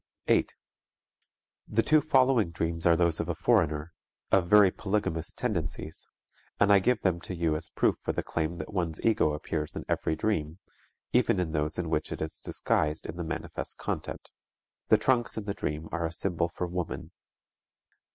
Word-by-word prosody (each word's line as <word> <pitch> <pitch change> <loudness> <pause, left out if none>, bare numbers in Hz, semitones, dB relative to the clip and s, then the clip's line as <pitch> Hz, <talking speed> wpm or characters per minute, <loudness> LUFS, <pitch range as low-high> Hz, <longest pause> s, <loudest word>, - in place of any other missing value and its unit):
8. - - +3 1.2
The 115 +2 +2
two 155 0 +4
following 130 - +3
dreams 85 0 -1
are 85 - +6
those 85 -1 +2
of 85 - -2
a 85 - -1
foreigner, 80 -6 +1 0.4
of 90 -3 +4
very 105 -3 +7
polygamous 95 -6 -2
tendencies, 80 -8 -3 0.5
and 100 0 +5
I 100 - +7
give 125 +6 +1
them 90 -3 +1
to 90 - -5
you 85 -2 +1
as 80 +1 -3
proof - - +1
for - - -2
the - - -2
claim 80 +1 -2
that 75 +5 -7
one's 85 -5 -1
ego 105 -9 +3
appears 75 0 -3
in - - -5
every 80 - 0
dream, 80 -3 -1 0.6
even - - +3
in 85 -3 -1
those 75 -1 -1
in 85 -3 -2
which 75 -1 -1
it - - -4
is 80 0 -5
disguised 75 +1 0
in - - -5
the 85 - -4
manifest 80 - -4
content. - - -5 0.6
The - - +6
trunks 120 -3 +1
in 110 - -2
the 100 -1 -3
dream 75 -3 -4
are 85 -1 -1
a - - -6
symbol 85 -1 -1
for 90 - -3
woman. 90 -1 -4
85 Hz, 180 wpm, -29 LUFS, 80-100 Hz, 1.2 s, very